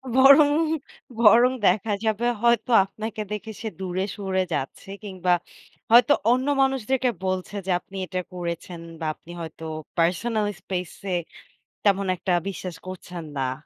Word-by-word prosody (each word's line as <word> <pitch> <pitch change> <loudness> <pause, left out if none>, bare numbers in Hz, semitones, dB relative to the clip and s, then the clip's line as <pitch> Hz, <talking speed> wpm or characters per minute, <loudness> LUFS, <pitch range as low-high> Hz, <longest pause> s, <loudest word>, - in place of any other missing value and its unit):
বরং, 280 +2 +8 0.7
বরং 235 +3 +7 0.2
দেখা 205 +3 +2
যাবে 220 +2 0 0.2
হয়তো 235 0 +2
আপনাকে 215 +2 -6
দেখে 215 +1 -4
সে 225 - -3
দূরে 185 0 -2
সরে 190 -2 0
যাচ্ছে, 145 +6 -4
কিংবা 185 -3 0 0.6
হয়তো 240 +4 +7 0.2
অন্য 255 +2 +1
মানুষদেরকে 265 -1 +1 0.2
বলছে 185 +2 -2
যে, 190 - -1
আপনি 195 - -11
এটা 185 0 -3
করেছেন 170 0 -5 0.2
বা 165 - -4
আপনি 170 - -15
হয়তো 160 0 -8 0.3
পার্সোনাল 205 +6 +1
স্পেস 180 -2 -3 0.2
এ, - - +2 0.7
তেমন 200 -1 +3
একটা 180 +1 -1 0.2
বিশ্বাস 185 -3 -6
করছেন 180 -2 -7
না। 130 -1 0
195 Hz, 135 wpm, -24 LUFS, 180-235 Hz, 0.7 s, বরং